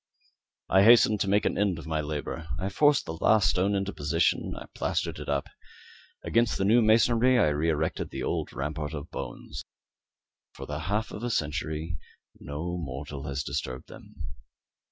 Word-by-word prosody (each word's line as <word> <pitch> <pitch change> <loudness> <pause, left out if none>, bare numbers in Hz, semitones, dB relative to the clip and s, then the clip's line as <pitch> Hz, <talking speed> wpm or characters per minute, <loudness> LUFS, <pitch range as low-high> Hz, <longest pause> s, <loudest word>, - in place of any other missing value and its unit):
I 95 - +5
hastened 110 -1 +6
to 100 - 0
make 100 +1 +3
an - - 0
end 100 -4 +1
of 85 - -8
my 80 -1 -1
labour. 75 +1 -4
I 95 +3 -2
forced 145 +8 +3
the 80 - -5
last 110 +4 +4
stone 100 +3 +1
into 100 0 -1
its - - -18
position; 80 +3 +1
I - - -8
plastered - - -2
it - - -7
up. 70 -1 0 0.8
Against 115 -1 +2
the 95 - 0
new 115 +4 +5
masonry 115 +3 +4
I 75 - +4
re 75 +3 0
erected 80 0 -1
the - - -5
old - - -2
rampart 75 +2 -4
of 75 +2 -7
bones. - - -6 0.9
For - - -8
the 75 0 -4
half 105 +2 -1
of - - -7
a 120 - -2
century 80 -3 -2 0.4
no 85 +5 -4
mortal 70 -1 -6
has 70 0 -2
disturbed 65 0 -4
them. - - -13
85 Hz, 175 wpm, -28 LUFS, 75-105 Hz, 0.9 s, hastened